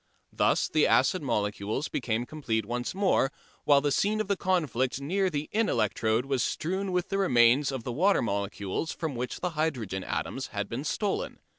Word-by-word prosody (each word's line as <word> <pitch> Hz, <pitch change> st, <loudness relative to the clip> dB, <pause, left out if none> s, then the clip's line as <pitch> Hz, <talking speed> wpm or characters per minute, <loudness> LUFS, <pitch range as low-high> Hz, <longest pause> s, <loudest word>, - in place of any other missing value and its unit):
Thus -, -, +2 dB
the -, -, +3 dB
acid -, -, +3 dB
molecules 105 Hz, +6 st, -1 dB
became 120 Hz, -1 st, -2 dB
complete 115 Hz, -8 st, -2 dB
once 120 Hz, -, -3 dB
more, 190 Hz, -8 st, +2 dB, 0.3 s
while 140 Hz, -1 st, +5 dB
the 145 Hz, 0 st, 0 dB
scene 210 Hz, +8 st, +1 dB
of 215 Hz, -, -1 dB
the 200 Hz, -, +1 dB
conflict 145 Hz, -10 st, 0 dB
near 190 Hz, +7 st, 0 dB
the 150 Hz, -3 st, -3 dB
in 220 Hz, +1 st, +1 dB
electrode 110 Hz, +3 st, +1 dB
was 135 Hz, -2 st, 0 dB
strewn 190 Hz, +4 st, -2 dB
with 180 Hz, 0 st, -1 dB
the 195 Hz, -, 0 dB
remains 125 Hz, -4 st, +4 dB
of 130 Hz, -3 st, -4 dB
the 125 Hz, -, -4 dB
water 190 Hz, +8 st, +3 dB
molecules 100 Hz, -, -2 dB
from 160 Hz, -4 st, -4 dB
which 125 Hz, +1 st, -4 dB
the 180 Hz, -, -1 dB
hydrogen 125 Hz, -, -2 dB
atoms -, -, -3 dB
had -, -, -4 dB
been -, -, -5 dB
stolen. -, -, -2 dB
140 Hz, 180 wpm, -28 LUFS, 115-180 Hz, 0.3 s, while